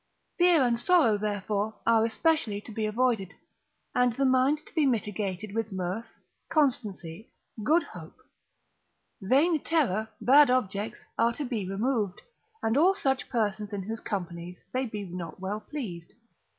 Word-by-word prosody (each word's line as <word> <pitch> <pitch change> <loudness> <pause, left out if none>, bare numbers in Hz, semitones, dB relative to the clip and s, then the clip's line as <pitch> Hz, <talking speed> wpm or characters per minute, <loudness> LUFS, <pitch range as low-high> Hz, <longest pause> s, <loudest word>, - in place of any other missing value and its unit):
Fear 345 -5 +5
and 235 -2 +1
sorrow, 305 -6 +4
therefore, 205 +1 -2
are 225 -1 +4
especially 230 -2 +1
to 220 - -11
be 215 0 -2
avoided, 220 -4 0 0.6
and 250 0 +3
the 275 +4 0
mind 260 +3 +3
to - - -17
be 320 -3 +2
mitigated 210 -4 -2
with 225 -1 -2
mirth, 190 +4 -3 0.4
constancy, 220 - -1 0.3
good 320 +8 +3
hope; - - -11 1.0
vain 290 - +3
terror, 220 - +1
bad 285 +2 +6
objects 210 -4 -1
are 235 +1 +3
to 290 - -4
be 220 -7 -3
removed, 210 -1 -1 0.4
and 225 +3 +1
all 365 +6 +5
such 270 -7 -1
persons 210 -3 -1
in 200 -2 -3
whose 225 +3 -4
companies 180 -4 -5
they 255 0 0
be 210 -2 -5
not 175 -1 -7
well 195 +3 -3
pleased. 195 - -7
220 Hz, 145 wpm, -28 LUFS, 200-260 Hz, 1.0 s, bad